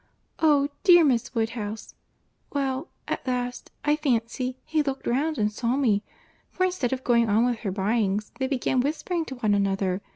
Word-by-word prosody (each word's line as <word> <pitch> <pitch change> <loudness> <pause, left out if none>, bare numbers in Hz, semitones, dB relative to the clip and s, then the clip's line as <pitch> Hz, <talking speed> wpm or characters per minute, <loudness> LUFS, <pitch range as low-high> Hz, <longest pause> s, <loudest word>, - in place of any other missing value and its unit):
—Oh! 290 -3 +4
dear, 350 -4 +8
Miss 255 -4 +1
Woodhouse—well, 235 - -4 0.2
at - - -4
last, 250 -1 -2 0.2
I 295 0 +4
fancy, 255 -3 -1
he 315 -1 +1
looked 275 -2 -3
round 295 +5 0
and 210 -1 +1
saw 235 +3 -1
me; 220 -8 +2 0.5
for 370 - -2
instead 360 -10 -1
of 260 0 -2
going 235 -2 +3
on 220 +3 +4
with 245 -2 0
her 200 - -3
buyings, 205 +1 0
they 265 - 0
began 260 -1 0
whispering 320 +4 -2
to 265 - -7
one 220 -4 +1
another. 195 -1 0
250 Hz, 165 wpm, -26 LUFS, 220-285 Hz, 0.5 s, dear